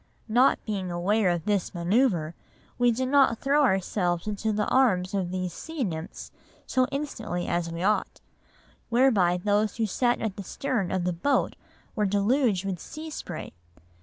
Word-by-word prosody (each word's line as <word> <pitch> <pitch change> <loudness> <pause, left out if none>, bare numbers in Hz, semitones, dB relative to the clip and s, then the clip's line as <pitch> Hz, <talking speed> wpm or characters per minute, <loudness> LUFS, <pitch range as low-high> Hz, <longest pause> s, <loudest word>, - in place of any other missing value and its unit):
Not 245 +5 +4
being 195 -4 -3
aware 185 +4 +1
of 175 -2 -1
this 205 -3 0
manœuvre, 175 -2 +1 0.5
we 245 0 +4
did 255 +3 -1
not 270 -4 +4
throw 280 +4 +2
ourselves 185 -7 +1
into 215 +1 -2
the 210 0 0
arms 205 -8 +2
of 190 -3 -1
these 185 -1 -3
sea 320 - -5
nymphs 165 -2 -5 0.3
so 255 -1 +1
instantly 230 -11 -3
as 170 -1 -1
we 165 +1 -4
ought, 210 +2 0 0.7
whereby 230 -8 +3
those 205 +3 +1
who 225 - +1
sat 240 +4 +1
at 220 -4 -3
the 200 - -5
stern 235 -1 -2
of 185 -1 0
the 180 0 0
boat 270 +12 0 0.4
were 210 -3 +1
deluged 205 0 +1
with 190 -3 -3
sea 315 - -8
spray. 175 - -7
205 Hz, 165 wpm, -26 LUFS, 180-245 Hz, 0.7 s, Not